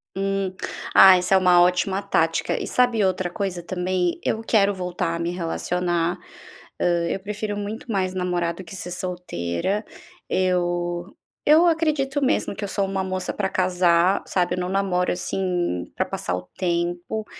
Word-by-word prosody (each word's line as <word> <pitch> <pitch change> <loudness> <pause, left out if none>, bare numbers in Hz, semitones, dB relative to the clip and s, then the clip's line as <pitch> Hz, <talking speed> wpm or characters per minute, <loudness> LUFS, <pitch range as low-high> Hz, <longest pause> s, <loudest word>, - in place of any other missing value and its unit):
Hum. 195 -1 -1 0.4
Ah, 190 -1 +9
essa 180 +2 +2
é - - +7
uma 180 -1 +5
ótima 180 +2 +2
tática. 165 -5 0
E - - -4
sabe 245 -4 +2
outra 185 -1 0
coisa 185 -2 -4
também? 180 0 -1
Eu 220 - -1
quero 205 -3 +3
voltar 180 -2 -2
a - - -4
me 170 +1 -1
relacionar. 175 0 -1 0.6
Hã, - - +2 0.2
eu 195 - -2
prefiro 210 +1 -4
muito 210 +4 -6
mais 185 -2 0
namorar 180 -2 -1
do 190 - -9
que 175 +2 -10
ser 180 -1 -6
solteira. 180 - -3 0.4
Eu 175 -1 0 0.4
eu 310 +4 +6
acredito 300 -4 +1
mesmo 255 -6 +1
que - - -6
eu 205 - -2
sou 200 0 -1
uma 195 0 -2
moça 185 -1 -3
pra 195 -2 -1
casar, 180 0 +2
sabe, 180 -2 0
eu - - -4
não 180 0 -2
namoro 190 -2 +1
assim, 180 - -2
pra - - 0
passar 90 - -3
o 90 0 -7
tempo. 175 +4 -2
185 Hz, 165 wpm, -23 LUFS, 175-195 Hz, 0.6 s, Ah